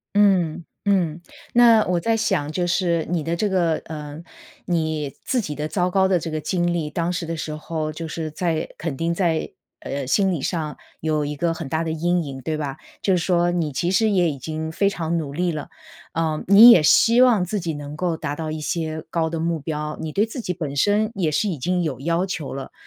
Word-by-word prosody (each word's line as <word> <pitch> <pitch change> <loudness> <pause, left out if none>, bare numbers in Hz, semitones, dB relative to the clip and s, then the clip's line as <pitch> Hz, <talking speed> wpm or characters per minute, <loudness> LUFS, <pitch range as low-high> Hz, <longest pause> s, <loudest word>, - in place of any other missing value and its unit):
嗯， 185 -6 +3 0.2
嗯。 175 -5 +1 0.3
那 230 -3 +6
我 175 -1 +1
在 225 +5 +1
想 190 -9 0
就 175 +3 -1
是 170 -2 +1
你 175 -3 0
的 165 +3 -2
这 210 +4 0
个， 175 -4 +2
呃， 150 0 -7 0.4
你 155 -4 -1
自 255 - +1
己 150 -8 -4
的 150 +2 -3
糟 180 +1 0
糕 190 0 +3
的 185 -2 +3
这 165 0 -5
个 155 0 -2
经 175 +1 0
历 160 -3 -2
当 170 +3 -1
时 170 -1 -3
的 165 +1 -3
时 155 -1 -4
候 155 0 -4
就 160 +1 -6
是 155 0 -4
在 160 0 -1
肯 155 -4 -3
定 165 +3 -1
在， 170 -3 0 0.3
呃， 140 -2 -4
心 195 +7 +2
理 165 - -2
上 155 -2 -2 0.2
有 155 -1 0
一 145 0 -4
个 165 +3 0
很 160 -4 -6
大 160 +4 -1
的 160 - -2
阴 175 +1 0
影 135 -2 -7
对 155 +4 -2
吧？ 145 -3 -4 0.2
就 190 -2 +3
是 - - +1
说 175 -1 +2
你 170 -3 -1
其 170 +7 -1
实 220 +3 +3
也 180 -5 +3
已 140 - -6
经 160 +3 -4
非 200 +4 +2
常 170 -4 -2
努 145 -4 -4
力 175 +2 0
了， 150 -2 -5 0.5
嗯， 160 -2 -1
你 215 +5 +10
也 175 -9 +7
希 230 +10 +5
望 235 -8 +5
自 205 +3 -2
己 165 -2 -3
能 145 0 -7
够 175 -1 -1
达 145 -2 -3
到 155 0 -4
一 155 0 -4
些 155 0 -3
高 165 -1 0
的 165 - -3
目 165 0 -1
标， 150 0 -4
你 160 - -4
对 205 - +2
自 240 +3 -6
己 180 - -2
本 155 -5 -4
身 210 +6 +2
也 175 -6 0
是 205 +8 +1
已 170 -7 -3
经 180 +6 0
有 135 -5 -3
要 170 +5 0
求 165 -6 -4
了， 135 0 -6
165 Hz, 245 characters per minute, -22 LUFS, 155-180 Hz, 0.5 s, 你